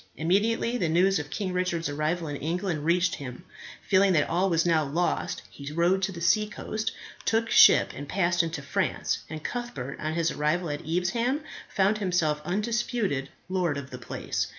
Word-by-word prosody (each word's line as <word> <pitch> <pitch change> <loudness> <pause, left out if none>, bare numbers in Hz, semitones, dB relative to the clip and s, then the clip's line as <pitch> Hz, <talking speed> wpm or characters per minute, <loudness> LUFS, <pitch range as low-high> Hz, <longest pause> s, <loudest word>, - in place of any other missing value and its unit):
Immediately 220 +8 +1
the 170 - +1
news 185 +3 +3
of 145 0 -6
King 190 0 -3
Richard's 180 -2 -1
arrival 155 +3 -1
in 145 -1 -4
England 165 0 -2
reached 175 +2 +2
him, 125 +2 -7 0.4
feeling 195 0 +4
that 150 -3 +3
all 180 +4 +1
was 165 -1 +2
now 165 -2 +3
lost, 165 +5 -1
he 140 0 -8
rode 175 +4 +2
to 195 +1 0
the 170 - -8
seacoast, 215 +4 0 0.3
took 225 +1 +1
ship, - - +7
and 145 +1 -7
passed 175 -2 +2
into 165 -4 -4
France, 140 - -1
and 155 0 -7
Cuthbert, 145 - -5
on 155 +1 -2
his 170 -1 +1
arrival 155 +3 0
at 145 - -4
Evesham, 210 - 0 0.3
found 200 +2 +2
himself 170 -6 +1
undisputed 210 - -1 0.2
lord 180 -5 0
of 140 -1 -7
the 125 - -7
place. 120 - -3
175 Hz, 175 wpm, -27 LUFS, 155-195 Hz, 0.4 s, ship